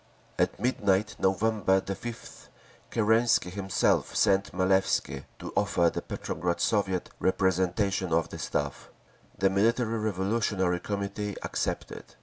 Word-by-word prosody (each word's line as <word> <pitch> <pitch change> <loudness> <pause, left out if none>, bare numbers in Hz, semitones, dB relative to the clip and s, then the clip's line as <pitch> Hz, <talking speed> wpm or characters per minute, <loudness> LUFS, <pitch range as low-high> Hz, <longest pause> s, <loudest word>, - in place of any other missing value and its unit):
At - - +1
midnight 105 -4 +1
November 95 0 +2
5th 100 +5 -7 0.4
Kerensky 115 -3 +2
himself 95 0 0
sent 100 0 +3
Malevsky 95 +1 +1
to - - -8
offer 90 -5 +2
the - - -4
Petrograd 85 0 -3
Soviet 95 -4 0
representation 95 0 +1
on 80 0 +3
the - - -7
Staff. 70 -2 -3 0.5
The 95 - +2
Military 115 +3 +1
Revolutionary 100 -3 0
Committee 100 +1 -3
accepted. - - -4
100 Hz, 110 wpm, -28 LUFS, 95-105 Hz, 0.5 s, sent